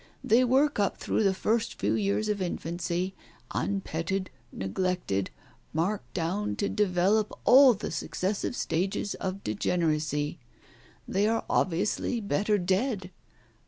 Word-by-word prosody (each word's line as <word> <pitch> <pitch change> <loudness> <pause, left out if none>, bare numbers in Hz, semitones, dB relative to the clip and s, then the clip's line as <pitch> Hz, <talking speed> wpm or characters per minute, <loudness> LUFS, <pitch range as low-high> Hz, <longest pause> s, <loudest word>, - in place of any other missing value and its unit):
They 235 +4 +4
work 265 +2 +3
up 200 - +1
through - - 0
the 200 -2 +4
first 220 +3 0
few - - +1
years 205 +1 0
of 210 -2 -1
infancy, 175 +1 -2 0.4
unpetted, 190 -1 -2 0.2
neglected, 100 - -1 0.4
marked 185 +6 -2
down 185 +5 -1
to 200 - -1
develop 205 +2 +2
all 260 -1 +8
the 205 - -5
successive 190 +7 -2
stages 190 +3 -1
of 190 +1 -4
degeneracy. 150 - 0 0.7
They 200 +2 +1
are 225 +1 0
obviously 200 +6 0
better 205 0 +1
dead. 190 +1 0
195 Hz, 120 wpm, -28 LUFS, 175-210 Hz, 0.7 s, all